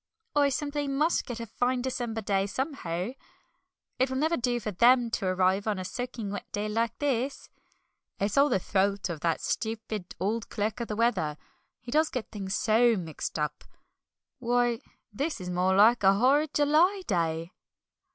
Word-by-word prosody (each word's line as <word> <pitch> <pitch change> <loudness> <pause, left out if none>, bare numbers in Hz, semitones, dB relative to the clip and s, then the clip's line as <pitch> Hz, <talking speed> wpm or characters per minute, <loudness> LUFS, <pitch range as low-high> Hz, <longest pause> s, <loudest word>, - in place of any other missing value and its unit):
"I 285 -1 +4
simply 290 +1 -2
must 300 +5 +1
get 240 -3 -5
a 230 - -4
fine 245 +3 -1
December 240 -3 -3
day 195 -1 0
somehow. 205 - -3 0.9
It 260 +1 +3
will 260 - -2
never 315 +4 +2
do 240 -2 0
for 215 -2 -4
'them' 240 +4 +4
to 200 -4 -1
arrive 185 +2 +2
on 210 -2 0
a 185 - -4
soaking 235 -1 -5
wet 205 - -7
day 205 +1 -2
like 230 +2 -1
this. 270 -1 -2 0.7
It's 200 +1 0
all 280 +1 +5
the 190 - +2
fault 195 +1 0
of 160 - -5
that 165 +1 0
stupid 220 -4 -3
old 215 +5 -1
clerk 215 +1 -2
of 235 - -3
the 210 - -3
weather, 195 -10 +1 0.4
he 240 - -9
does 310 +2 +3
get 250 -4 -5
things 195 -2 -3
so 230 +2 +4
mixed 165 -4 -5
up! 150 -1 -3 0.8
Why, 240 -1 +1 0.3
this 290 +9 -2
is 180 -1 -5
more 180 +1 +2
like 225 +5 +6
a 195 0 +5
horrid 275 +7 +3
July 325 +7 +3
day!" 165 -3 -1
225 Hz, 170 wpm, -28 LUFS, 195-260 Hz, 0.9 s, like